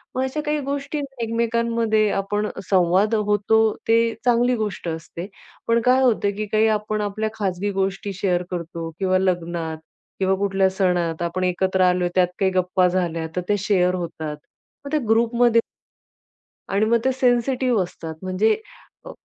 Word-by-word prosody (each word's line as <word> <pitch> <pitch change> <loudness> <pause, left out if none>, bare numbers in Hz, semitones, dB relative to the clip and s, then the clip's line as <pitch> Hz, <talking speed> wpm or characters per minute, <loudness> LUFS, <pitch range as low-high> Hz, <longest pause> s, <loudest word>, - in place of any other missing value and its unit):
मग 260 - 0
अशा 265 +4 -2
काही 300 0 0
गोष्टी 280 +2 -3
आहे 290 - -2
ना 270 -4 -7
एकमेकांमध्ये 230 -1 +1
आपण 205 +2 -1 0.2
संवाद 190 +4 +3
होतो, 210 0 +2 0.3
ते 230 0 +3
चांगली 245 +1 +3
गोष्ट 210 -5 -4
असते. 165 +2 -6 0.4
पण 230 0 +3
काय 255 +1 +5
होतं, 215 -5 +2
की 215 - -2
काही 220 0 +3
आपण 215 0 -3
आपल्या 210 +1 -2
खाजगी 200 -1 -2
गोष्टी 195 +1 -2
शेअर 180 -2 0
करतो 170 -1 -5
किंवा 185 -1 +2
लग्नात, 170 -3 -1 0.4
किंवा 190 0 +2
कुठल्या 195 -1 +1
सणात 180 -3 0
आपण 175 +2 -2
एकत्र 185 +1 +1
आलोय, 180 0 +1
त्यात 180 -1 +4
काही 190 -2 +2
गप्पा 185 0 +2
झाल्या, 170 -3 -1
तर 180 - 0
ते 205 - +3
शेअर 185 -2 +2
होतात. 160 -4 -5 0.5
मग 280 - -6
त्या 305 - +2
ग्रुपमध्ये 235 +1 +3 1.1
आणि 200 +2 +2
मग 235 +1 +3
ते 265 - +3
सेन्सिटिव्ह 250 -2 +2
असतात. 165 -2 -7
म्हणजे 185 +4 +2 0.5
अ, - - -9
200 Hz, 160 wpm, -22 LUFS, 180-230 Hz, 1.1 s, काय